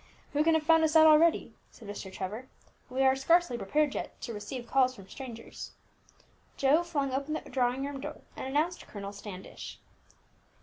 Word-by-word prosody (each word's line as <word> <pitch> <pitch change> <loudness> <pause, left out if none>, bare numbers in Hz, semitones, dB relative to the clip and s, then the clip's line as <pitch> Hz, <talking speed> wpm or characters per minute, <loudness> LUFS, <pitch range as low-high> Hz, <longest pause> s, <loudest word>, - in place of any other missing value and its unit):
"Who 295 +1 +3
can 325 0 +4
have 315 - +1
found 325 +1 +5
us 315 0 +2
out 315 0 +9
already?" 315 +1 +5 0.2
said 220 - -14
Mr. 205 -2 -6
Trevor. 210 +7 -5 0.4
"We 260 +1 0
are 265 0 +5
scarcely 330 +1 +3
prepared 280 +7 +1
yet - - -5
to 235 - -5
receive 220 +4 -6
calls 255 +1 +3
from 195 -4 -13
strangers." 245 -2 -8 0.8
Joe 280 +4 +4
flung 295 -6 -1
open 280 +3 -1
the - - -3
drawing 255 +1 +1
room 280 -1 -5
door, 300 +1 -7
and - - -5
announced 310 +6 -1
Colonel 200 -1 -7
Standish. 195 -2 -8
270 Hz, 175 wpm, -30 LUFS, 235-310 Hz, 0.8 s, out